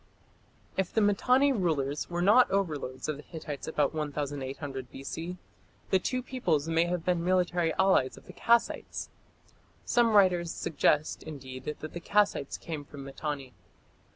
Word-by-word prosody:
If 190 Hz, -2 st, 0 dB
the -, -, +2 dB
Mitanni 250 Hz, +7 st, +4 dB
rulers 150 Hz, -, -1 dB
were 175 Hz, 0 st, -1 dB
not 230 Hz, +6 st, +6 dB
overlords 150 Hz, -9 st, -2 dB
of 155 Hz, -2 st, -2 dB
the -, -, -9 dB
Hittites 150 Hz, -3 st, -7 dB
about 150 Hz, -2 st, +1 dB
1800 140 Hz, -3 st, -4 dB
B.C., 165 Hz, +6 st, -6 dB, 0.5 s
the 190 Hz, -, +5 dB
two 255 Hz, +5 st, -2 dB
peoples 170 Hz, -, 0 dB
may 165 Hz, +1 st, +3 dB
have 175 Hz, -1 st, -2 dB
been 175 Hz, -2 st, +1 dB
military 175 Hz, -2 st, +2 dB
allies 190 Hz, -9 st, +3 dB
of -, -, -15 dB
the -, -, -11 dB
Kassites. 235 Hz, 0 st, +1 dB, 0.8 s
Some 235 Hz, -2 st, +3 dB
writers 180 Hz, -4 st, +4 dB
suggest, 150 Hz, 0 st, +1 dB
indeed, 130 Hz, -4 st, -8 dB
that 150 Hz, -, -5 dB
the 155 Hz, +3 st, -6 dB
Kassites 200 Hz, -6 st, +1 dB
came 155 Hz, -3 st, -5 dB
from 140 Hz, -1 st, -10 dB
Mitanni. 135 Hz, -1 st, -5 dB
165 Hz, 145 wpm, -29 LUFS, 145-190 Hz, 0.8 s, not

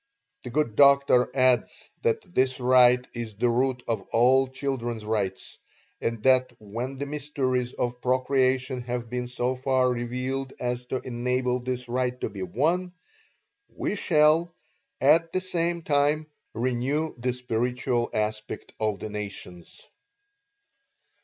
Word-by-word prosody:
The 125 Hz, -, -7 dB
good 120 Hz, -4 st, 0 dB
doctor 140 Hz, -2 st, +5 dB
adds 130 Hz, -2 st, +2 dB
that 455 Hz, -, -1 dB
this 130 Hz, -2 st, +2 dB
right 125 Hz, 0 st, +5 dB
is 115 Hz, -3 st, -6 dB
the 120 Hz, +4 st, +1 dB
root 125 Hz, +1 st, 0 dB
of 115 Hz, -4 st, -1 dB
all 130 Hz, +3 st, +4 dB
children's 130 Hz, -4 st, -4 dB
rights; 100 Hz, -3 st, -3 dB, 0.4 s
and 115 Hz, -2 st, -2 dB
that 130 Hz, -1 st, +4 dB
when 120 Hz, +6 st, -5 dB
the 140 Hz, -, -3 dB
mysteries 135 Hz, -4 st, -2 dB
of 125 Hz, 0 st, -3 dB
procreation 130 Hz, 0 st, +1 dB
have 120 Hz, -1 st, -4 dB
been 125 Hz, 0 st, -2 dB
so 125 Hz, +1 st, -1 dB
far 130 Hz, 0 st, +2 dB
revealed 125 Hz, +2 st, -3 dB
as 125 Hz, 0 st, -3 dB
to 130 Hz, -, -2 dB
enable 125 Hz, +1 st, -1 dB
this 125 Hz, 0 st, -4 dB
right 125 Hz, +1 st, -1 dB
to -, -, -2 dB
be 100 Hz, -1 st, -7 dB
won, 165 Hz, -, 0 dB, 0.8 s
we -, -, -3 dB
shall, 160 Hz, -2 st, +3 dB, 0.5 s
at 165 Hz, +4 st, +4 dB
the 185 Hz, -, +2 dB
same 175 Hz, -2 st, -1 dB
time 150 Hz, +1 st, +2 dB, 0.3 s
renew 130 Hz, +6 st, -1 dB
the 125 Hz, +1 st, 0 dB
spiritual 125 Hz, 0 st, -1 dB
aspect 110 Hz, 0 st, -3 dB
of 110 Hz, -2 st, 0 dB
the 105 Hz, -, -6 dB
nations. 100 Hz, -4 st, -8 dB
125 Hz, 135 wpm, -26 LUFS, 120-135 Hz, 0.8 s, doctor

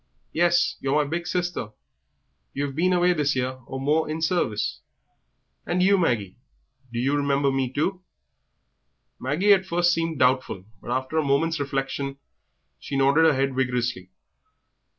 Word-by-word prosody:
"Yes, 175 Hz, +1 st, +2 dB
you're 135 Hz, +1 st, -1 dB
my 150 Hz, -1 st, +2 dB
big 170 Hz, +3 st, -3 dB
sister; 175 Hz, -12 st, -2 dB, 0.8 s
you've 140 Hz, 0 st, -2 dB
been 180 Hz, +4 st, +2 dB
away 180 Hz, 0 st, +3 dB
this 145 Hz, -4 st, 0 dB
year 130 Hz, 0 st, -2 dB
or 135 Hz, -, -5 dB
more 150 Hz, +4 st, +1 dB
in 155 Hz, +1 st, -3 dB
service." 160 Hz, -, -1 dB, 0.8 s
"And 180 Hz, +1 st, 0 dB
you, 200 Hz, +2 st, +5 dB
Maggie, 120 Hz, -, 0 dB, 0.5 s
do 120 Hz, -, -5 dB
you 135 Hz, +4 st, +1 dB
remember 140 Hz, -1 st, +1 dB
me 135 Hz, -2 st, -1 dB
too?" 180 Hz, +7 st, -1 dB, 1.2 s
Maggie 170 Hz, +10 st, +3 dB
at 190 Hz, -1 st, +1 dB
first 175 Hz, 0 st, +2 dB
seemed 165 Hz, -2 st, -1 dB
doubtful, 125 Hz, -7 st, +1 dB, 0.2 s
but -, -, -10 dB
after 130 Hz, +5 st, -1 dB
a -, -, +1 dB
moment's 155 Hz, +4 st, +1 dB
reflection 135 Hz, 0 st, -3 dB, 0.6 s
she 140 Hz, -, -4 dB
nodded 140 Hz, +4 st, +4 dB
her 160 Hz, -, +5 dB
head 135 Hz, 0 st, 0 dB
vigorously. 120 Hz, -7 st, -1 dB
140 Hz, 150 wpm, -24 LUFS, 130-170 Hz, 1.2 s, you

